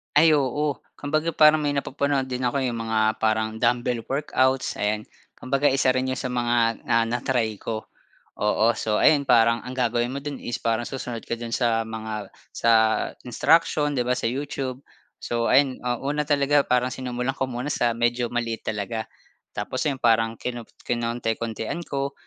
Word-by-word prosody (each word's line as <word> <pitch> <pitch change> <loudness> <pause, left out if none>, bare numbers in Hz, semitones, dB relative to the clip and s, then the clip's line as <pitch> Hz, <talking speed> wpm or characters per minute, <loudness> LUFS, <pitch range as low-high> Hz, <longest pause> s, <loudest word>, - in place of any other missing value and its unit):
Ay, 160 +2 +7
oo 145 0 +1 0.2
kumbaga 155 +3 -1
parang 155 0 +6
may 145 -1 0
napapanood 140 0 0
din 125 0 -3
ako 125 +3 0
eh, 130 - +1
yung 115 - -4
mga 110 0 +1
parang 110 0 +1
dumbbell 120 0 +1
workouts, 130 -2 +1
ayan. 105 +1 0 0.3
Kumbaga 140 +2 +1
isa 130 -1 +2
rin 130 0 0
'yon 130 - -2
sa 125 0 -3
mga, 120 -2 +1
ah, 115 0 +4
na-try 120 -1 0
ko, 110 -1 -4 0.6
oo. 105 +1 +3
So 110 -1 -1
ayun 145 -2 +4
parang 115 -1 +4
ang 130 0 -7
gagawin 120 -1 +1
mo - - -3
do'n 145 -2 -5
is 120 - -3
parang 115 +1 -1
susunod 125 -4 -5
ka 115 - -3
do'n 115 -1 -6
sa 115 -2 +1
mga 110 -1 -5 0.2
sa 115 - +1 0.5
instruction, 150 +3 +2
'di 125 - 0
ba, 125 - +3
sa - - -3
YouTube. 130 0 -4 0.4
So, 115 0 -1
ayan, 130 0 +3
ah, 120 0 0
una 150 +2 -1
talaga 145 0 +4
parang 125 0 +1
sinumulan 125 0 -3
ko 130 - 0
muna 125 +3 -4
sa 120 - +2
medyo 120 0 +1
maliit 115 -2 -2
talaga. 110 +1 -3 0.5
Tapos 105 +5 -3
'yon 140 -3 0
parang 115 -1 +3
kinop 120 -2 -5 0.2
kinonti-kontian 115 +4 -2
ko. 140 0 -2
125 Hz, 170 wpm, -24 LUFS, 115-135 Hz, 0.6 s, Ay